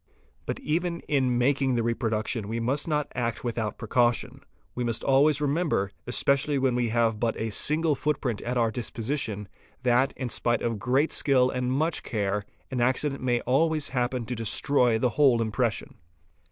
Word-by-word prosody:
But - - -3
even 170 +2 -1
in 130 -4 +1
making 135 +1 +2
the 115 - +1
reproduction 115 -2 -1
we 115 +2 -3
must 130 +7 0
not 150 -2 -1
act 115 -2 -2
without 115 -3 -3
pre 115 - -7
caution. 120 +1 +1 0.3
We 125 - -3
must 115 -1 -1
always 140 +2 +4
remember, 145 - 0 0.2
especially 140 +3 +2
when 130 -2 +1
we 120 -1 0
have 115 -1 +1
but 115 -1 0
a 110 - -3
i - - -2
single 155 +8 +1
footprint 135 -5 -2
at 125 +1 -2
our 115 -2 +2
disposition, 115 -2 -3 0.4
that, 125 +2 +3
in 130 -2 -3
spite 120 0 0
of 115 -3 -1
great 130 +8 +1
skill 130 -3 +3
and 125 0 -1
much 155 +5 0
care, 105 -2 -2 0.3
an 125 -2 -1
accident 135 +3 0
may 120 -2 +1
always 155 +4 +1
happen 125 -1 -1
to 125 - -4
destroy 120 +1 +2
the 125 +2 +1
whole 130 -5 +5
impression. 115 0 -2
125 Hz, 175 wpm, -27 LUFS, 115-140 Hz, 0.4 s, whole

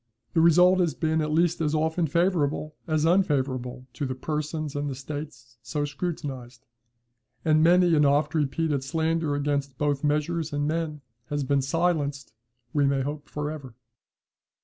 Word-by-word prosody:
The 165 - +3
result 180 +3 +6
has 170 -3 +1
been 160 0 0
at 155 - -1
least 170 +1 +2
as 155 -1 +1
often 160 +2 +1
favourable 155 -2 0
as 155 -1 +1
unfavourable 130 -8 0
to 145 - -3
the 130 - -3
persons 150 +1 -3
and 145 0 -2
the 135 - -4
states 140 -3 -8
so 145 +5 -2
scrutinized; 140 -5 -5 0.8
and 155 -1 +4
many 175 +1 +5
an 150 -2 +4
oft 145 +2 +2
repeated 150 -1 0
slander 160 +1 0
against 140 -2 -1
both 145 -1 0
measures 150 +2 0
and 145 0 0
men 155 -2 -2 0.3
has 145 0 -2
thus 135 - -4
been 140 0 +2
silenced, 145 -3 -1 0.4
we 145 -2 +3
may 135 -1 +1
hope, 145 +1 -5
for 150 0 -3
ever. 135 -6 -9
150 Hz, 160 wpm, -26 LUFS, 140-160 Hz, 0.8 s, result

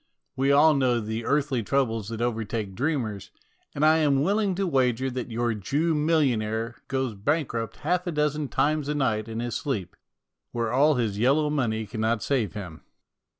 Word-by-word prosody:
We 135 +1 +2
all 150 +3 +6
know 130 -4 +2
the 110 +1 -4
earthly 140 -4 +1
troubles 115 -3 0
that 115 0 -5
overtake 115 -3 -2
dreamers, 110 - -2 0.5
and 145 +1 +2
I 155 +1 +6
am 140 -3 +3
willing 200 +1 +1
to 195 +2 -1
wager 130 -4 +1
that 125 0 -4
your 120 0 0
Jew 140 - 0
million 150 -6 +2
aire 110 +2 -3
goes 130 -3 -1
bankrupt 115 0 -2
half 180 0 -1
a - - 0
dozen 150 -1 0
times 150 +1 0
a 150 - 0
night 115 -6 0
in 115 0 -4
his 120 -1 -3
sleep, 110 - -3 0.6
where 115 -1 -1
all 145 +3 +4
his 110 -5 -1
yellow 145 +5 +3
money 110 -7 -1
cannot 110 -1 -1
save 130 -7 0
him. 90 -7 -8
125 Hz, 175 wpm, -26 LUFS, 110-150 Hz, 0.6 s, all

